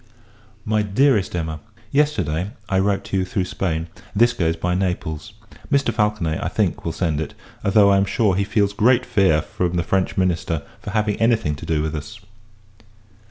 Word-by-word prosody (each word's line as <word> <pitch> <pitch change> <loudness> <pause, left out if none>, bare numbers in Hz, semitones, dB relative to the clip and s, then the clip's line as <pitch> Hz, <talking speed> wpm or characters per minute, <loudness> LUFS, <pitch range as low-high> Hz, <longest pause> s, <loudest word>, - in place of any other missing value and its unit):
MY 110 0 +1
EVER 105 -1 -2
DEAREST 130 -10 +3
EMMA, 80 -2 -3 0.3
Yesterday, 105 - 0
I 95 - +1
wrote 100 0 +1
to 95 - -2
you, 95 - +1
through 90 0 -1
Spain; 80 -3 -2 0.3
this 120 +3 +4
goes 80 -3 0
by 90 +2 -1
Naples. 90 0 -2 0.4
Mr. 140 -5 +2
Falconet, 105 -7 0
I - - -1
think, - - -1
will 85 - -2
send 80 -3 -1
it; 80 - -6 0.3
although, 100 0 +5
I 100 - +5
am 100 - +3
sure, 100 0 +1
he 100 - +1
feels 100 0 +1
great 120 +5 +3
fear 95 -8 +3
from 90 +1 -2
the 85 - +1
French 95 +1 0
minister, 85 -4 0 0.2
for - - -7
having 105 0 0
any 115 +1 +4
thing 105 -9 -2
to 75 - -8
do 75 -2 +1
with 80 0 -2
us. 100 +8 -7
95 Hz, 190 wpm, -21 LUFS, 80-105 Hz, 0.4 s, although